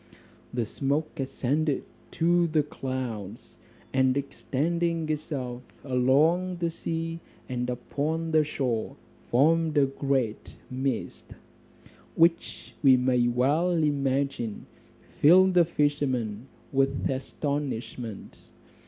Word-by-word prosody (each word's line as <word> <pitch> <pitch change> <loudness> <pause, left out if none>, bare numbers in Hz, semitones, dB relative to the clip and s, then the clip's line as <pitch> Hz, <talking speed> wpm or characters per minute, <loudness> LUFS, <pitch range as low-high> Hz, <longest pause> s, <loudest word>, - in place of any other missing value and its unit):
The 120 -2 -1
smoke 140 +8 -2
ascended 140 +3 0 0.3
to 170 +1 +3
the 155 -2 +2
clouds, 130 -8 -6 0.4
and 130 0 +3
extending 165 +4 -1
itself 135 -5 -3 0.2
along 145 +8 +2
the 170 -1 -1
sea 165 0 -4 0.3
and 125 -1 -2
upon 155 +6 -2
the 155 -1 +4
shore 125 -7 -2 0.3
formed 160 +4 +3
a 140 - +6
great 135 -4 -2
mist, 130 -1 -3 0.8
which 165 -7 +1
we 130 -2 +7
may 125 -1 +2
well 135 +9 +2
imagine 140 -7 0 0.5
filled 185 +5 +6
the 175 -1 +5
fisherman 135 -8 -1 0.3
with 135 0 +1
astonishment. 130 -5 -4
140 Hz, 95 wpm, -27 LUFS, 125-160 Hz, 0.8 s, we